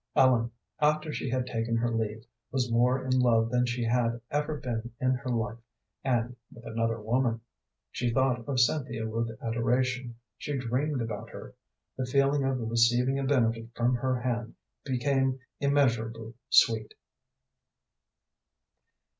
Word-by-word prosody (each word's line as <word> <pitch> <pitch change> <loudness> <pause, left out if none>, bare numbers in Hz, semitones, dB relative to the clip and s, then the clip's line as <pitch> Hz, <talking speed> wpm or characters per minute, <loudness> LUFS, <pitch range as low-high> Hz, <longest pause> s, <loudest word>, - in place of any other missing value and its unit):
Ellen, 125 -3 +4 0.3
after 150 +1 +2
she 135 - -3
had 130 0 0
taken 115 -1 -1
her 120 +1 0
leave, 110 0 -2 0.3
was 125 -2 0
more 125 +3 +2
in 130 0 +2
love 115 -2 +3
than 125 0 +2
she 120 0 -1
had 115 0 +1
ever 150 +1 -1
been 120 -3 -4
in 130 0 +2
her 130 0 -2
life, 115 -1 -1 0.4
and 120 -2 0 0.2
with 115 0 -14
another 115 0 -1
woman. 115 +1 0 0.5
She 120 -1 -1
thought 125 -1 +1
of 130 -3 +1
Cynthia 120 -3 +1
with 115 +1 -2
adoration; 120 +1 0 0.2
she 145 -1 -3
dreamed 130 +2 -1
about 110 -2 -5
her; - - -10 0.4
the 130 -1 -2
feeling 140 +2 +2
of 130 -4 -1
receiving 120 +4 +3
a - - -1
benefit 115 -4 +1
from 120 +1 +2
her 130 +1 0
hand 120 -2 -2 0.3
became 135 0 +1 0.2
immeasurably 115 -5 +1 0.2
sweet. 110 -2 +4
120 Hz, 140 wpm, -29 LUFS, 115-130 Hz, 0.5 s, Ellen